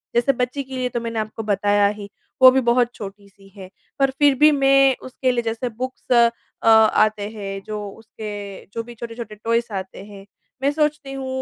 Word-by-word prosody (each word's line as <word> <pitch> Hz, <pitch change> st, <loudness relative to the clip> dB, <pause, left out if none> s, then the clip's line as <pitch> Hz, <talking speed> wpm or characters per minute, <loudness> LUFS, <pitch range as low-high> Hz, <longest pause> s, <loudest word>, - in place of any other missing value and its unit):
जैसे 240 Hz, +3 st, +3 dB
बच्ची 250 Hz, +3 st, -2 dB
के 265 Hz, 0 st, -9 dB
लिए 250 Hz, 0 st, -1 dB
तो 240 Hz, -, -3 dB
मैंने 230 Hz, -1 st, -3 dB
आपको 215 Hz, +1 st, -5 dB
बताया 205 Hz, 0 st, +2 dB
ही 205 Hz, -1 st, -5 dB, 0.3 s
वो 260 Hz, -, +11 dB
भी 265 Hz, 0 st, +2 dB
बहुत 240 Hz, 0 st, +2 dB
छोटी-सी 200 Hz, -1 st, -11 dB
है 185 Hz, -1 st, -10 dB, 0.3 s
पर 275 Hz, 0 st, +3 dB
फ़िर 285 Hz, 0 st, +3 dB
भी 305 Hz, 0 st, +7 dB
मैं 275 Hz, -1 st, +4 dB
उसके 255 Hz, 0 st, -1 dB
लिए 240 Hz, -, 0 dB
जैसे 230 Hz, +2 st, -3 dB
बुक्स 260 Hz, 0 st, -6 dB
अ, 235 Hz, -1 st, +1 dB
आते 215 Hz, -1 st, +4 dB
हैं 195 Hz, -2 st, -6 dB
जो 215 Hz, 0 st, -5 dB
उसके 205 Hz, -2 st, -9 dB
जो 230 Hz, -, -3 dB
भी 240 Hz, +1 st, -11 dB
छोटे-छोटे 230 Hz, -1 st, -8 dB
टॉयस 230 Hz, +2 st, -1 dB
आते 190 Hz, 0 st, -6 dB
हैं 200 Hz, -1 st, -12 dB, 0.4 s
मैं 280 Hz, +1 st, +2 dB
सोचती 300 Hz, -2 st, -1 dB
हूँ 270 Hz, -1 st, -5 dB
230 Hz, 190 wpm, -21 LUFS, 205-260 Hz, 0.4 s, वो